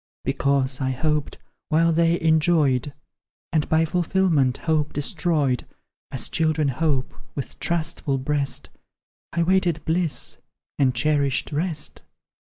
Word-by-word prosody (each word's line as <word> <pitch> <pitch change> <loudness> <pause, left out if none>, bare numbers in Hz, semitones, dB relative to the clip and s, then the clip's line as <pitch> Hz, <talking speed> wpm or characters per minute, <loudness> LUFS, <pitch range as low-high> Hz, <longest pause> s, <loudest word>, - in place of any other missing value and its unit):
'Because, 140 -1 +1
I 130 - 0
hoped 150 +3 -1 0.3
while 165 +1 +3
they 170 +1 +3
enjoyed, 155 -4 +2 0.6
And 155 -2 +1
by 160 +1 +3
fulfilment, 165 -6 +2
hope 155 -2 0
destroyed; 145 - +1 0.4
As 125 -4 -2
children 155 -2 +1
hope, 140 -1 0 0.2
with 140 - -6
trustful 165 -4 -1
breast, 140 +1 -1 0.6
I 170 - +1
waited 175 -3 +1
bliss 165 -1 -1 0.4
and 130 -3 +3
cherished 140 +1 +1
rest. 155 +1 -2
155 Hz, 110 wpm, -24 LUFS, 140-165 Hz, 0.6 s, while